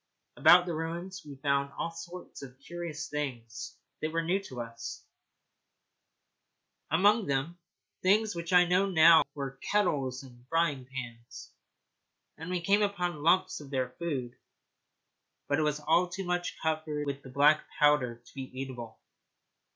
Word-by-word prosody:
About 180 0 +7
the 175 - -3
ruins 170 +4 -4
we 145 -2 -10
found 140 0 0
all 165 - -2
sorts 175 +2 -9
of 130 -2 -10
curious 165 0 -6
things 120 -6 -5 0.2
that 155 - -1
were 165 +1 0
new 180 +4 +1
to 130 -7 -8
us 115 0 -8 1.8
among 205 +7 +4
them, 145 +6 -1 0.4
things 210 +3 +3
which 170 0 -5
I 180 -1 +7
now 180 +3 +3
know 165 -3 +7
were 135 -2 -5
kettles 140 -11 +1
and 120 -2 -15
frying 165 -6 +1
pans; 120 -3 -8 0.8
and 160 +2 -8
we 180 -1 -1
came 200 +4 +3
across 180 -4 0
lumps 165 +5 +2
of 145 - -11
their 130 -2 -1
food, 135 -8 -3 1.1
but 145 +1 +1
it - - +2
was 150 -1 0
all 165 +4 +2
too 190 +2 -5
much 180 0 -2
covered 155 -2 -1
with 140 -1 -4
the 130 - -12
black 145 +3 +4
powder 125 -6 +3
to - - -18
be 135 -2 -6
eatable. 120 -4 -6
155 Hz, 150 wpm, -30 LUFS, 135-175 Hz, 1.8 s, About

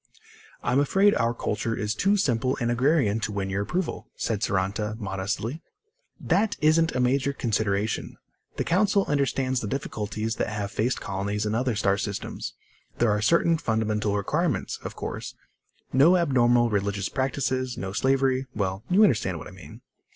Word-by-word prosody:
"I'm 125 +3 +2
afraid 195 +8 +4
our 115 0 +1
culture 115 +1 -2
is 105 0 -1
too 200 - +2
simple 130 - +1
and 120 -1 0
agrarian 120 -3 +2
to 110 -1 -3
win 100 -1 -3
your 100 +1 -1
approval," 175 - -3
said 105 -3 -2
Saranta 100 +3 -1
modestly. 105 +8 -3 0.6
"That 215 +1 +1
isn't 155 +1 +3
a - - +1
major 135 +2 +2
consideration. 110 -4 -1 0.4
The - - 0
Council 200 +2 +2
understands 135 -2 0
the 105 - -4
difficulties 110 -2 -3
that - - -1
have 105 -2 -4
faced 115 +5 0
colonies 100 +2 -2
in 105 - -1
other 125 0 0
star 100 -1 +1
systems. 105 -2 -4 0.4
There 120 -2 +3
are 105 0 +1
certain 165 +5 +3
fundamental 110 -4 0
requirements, 145 - -1
of - - -6
course: - - -6 0.6
no 155 +8 +6
abnormal 120 -7 +3
religious 100 0 -1
practices, 130 -1 -1
no 95 0 -4
slavery... 130 +3 +1
well, 95 -1 -2
you 190 +4 +5
understand 105 - +2
what - - -8
I - - -11
mean." 90 -5 -13
115 Hz, 160 wpm, -26 LUFS, 105-140 Hz, 0.6 s, no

